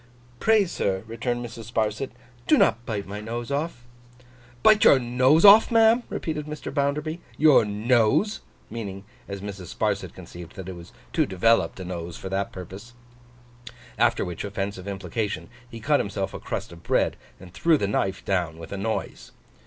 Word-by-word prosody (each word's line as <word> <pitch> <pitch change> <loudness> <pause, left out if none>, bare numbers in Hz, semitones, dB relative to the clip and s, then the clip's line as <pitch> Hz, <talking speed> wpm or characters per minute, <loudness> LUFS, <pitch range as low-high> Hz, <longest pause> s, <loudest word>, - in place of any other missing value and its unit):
'Pray, 220 -2 +4
sir,' 95 - -2
returned 120 +2 -3
Mrs. 115 -1 -9
Sparsit, 110 +3 -1 0.4
'do - - +5
not 115 +1 +2
bite 105 -3 -3
my 105 +2 -6
nose 120 +3 -5
off.' 140 -4 -3 0.8
'Bite 215 -1 +6
your - - +8
nose 130 +7 +3
off, 205 +2 +9
ma'am?' 225 +1 +5
repeated 150 -2 -4
Mr. 150 -2 -6
Bounderby. 150 +3 -1 0.2
'Your 150 -7 +6
nose!' 115 - +2 0.3
meaning, 100 -4 -6 0.2
as 100 -1 -6
Mrs. 100 -3 -7
Sparsit - - -2
conceived, 85 -1 -11
that 95 -2 -8
it 95 - -5
was 85 -1 -12 0.2
too - - +2
developed 100 +3 +2
a 95 - -6
nose 85 -2 -6
for 95 - -7
the 95 +1 0
purpose. 95 +7 -10 1.0
After - - +3
which 90 -2 -5
offensive 100 -1 -4
implication, 100 +2 -4 0.2
he 115 - -9
cut 145 +6 +2
himself 100 -1 -3
a - - -6
crust - - -5
of 85 -1 -12
bread, - - +1 0.2
and 90 -1 -13
threw 165 +8 +3
the 100 - -1
knife 95 -1 -1
down 85 -4 -1
with 85 - -10
a 100 - -4
noise. 110 +3 -4
110 Hz, 170 wpm, -25 LUFS, 95-140 Hz, 1.0 s, off